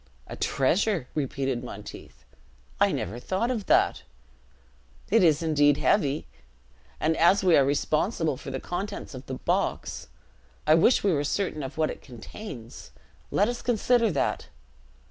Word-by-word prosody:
"A - - -8
treasure!" 170 - +1
repeated 135 -3 -2
Monteith; - - -10 0.5
"I - - +4
never 110 +7 -3
thought 190 - -1
of 220 -6 -3
that; - - +3 1.1
it 225 +1 +5
is 160 -1 +4
indeed 145 -3 +3
heavy! 145 -7 +1 0.7
and, 160 +1 +1
as 190 +4 +4
we 180 -3 +5
are 140 - +6
responsible 155 - 0
for 130 - -9
the 135 0 -4
contents 195 +4 -5
of 130 0 -9
the 130 - -4
box, - - -2 0.6
I 155 - +5
wish 170 +10 +4
we 200 -3 +3
were 145 -1 0
certain 155 +1 -2
of 135 +2 -7
what 155 -1 +1
it - - -10
contains; 120 - -10 0.4
let 205 - +2
us 240 0 -3
consider 240 0 +2
that!" 140 - -1
155 Hz, 145 wpm, -26 LUFS, 135-200 Hz, 1.1 s, are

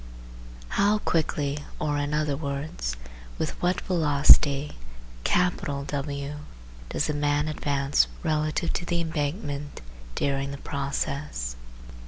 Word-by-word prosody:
How 205 +2 +3
quickly 150 -6 0 0.2
or, 145 -1 0
in 145 0 -1
other 150 -1 +1
words, 140 - -3 0.4
with - - -1
what 180 +1 +2
velocity 145 -3 +5 0.5
W 145 -4 0 0.5
does - - 0
the 150 - 0
man 145 0 +1
advance 140 -2 +2 0.2
relative 155 0 0
to - - -2
the 175 -1 0
embankment 145 -2 -2 0.4
during 140 0 0
the 140 - -5
process 140 - -3
145 Hz, 105 wpm, -27 LUFS, 140-155 Hz, 0.5 s, velocity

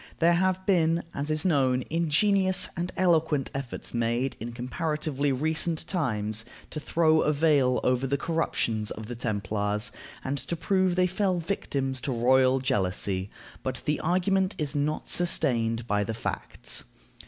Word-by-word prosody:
There 170 +1 +4
have 185 +1 +1
been, 170 -3 +2
as 145 +2 -3
is 155 +1 0
known, 130 -7 +2
ingenious 185 +4 +3
and 175 +1 -3
eloquent 160 -6 +2
efforts 135 -3 -6
made, 120 +3 0
in 120 +2 -5
comparatively 145 +3 -2
recent 160 +4 0
times, 110 - -1 0.3
to 155 - -4
throw 160 0 +3
a 150 - +2
veil 145 -4 +3
over 125 +1 +1
the 140 +2 +1
corruptions 120 -9 -1
of 110 - -6
the 120 +3 -6
Templars, 105 -1 -2 0.3
and 140 +1 -2
to 130 +7 -4
prove 185 +1 +1
that 185 - +2
they - - +5
fell 185 0 0
victims 140 -7 -2
to 135 - -2
royal 130 +2 +4
jealousy, 95 -4 0 0.3
but 130 -2 -4
the 150 - 0
argument 185 +3 +1
is 150 -2 -2
not 145 +1 -1
sustained 120 -10 +1
by 105 -3 +1
the 110 +2 -4
facts. - - -4
145 Hz, 155 wpm, -27 LUFS, 120-170 Hz, 0.3 s, they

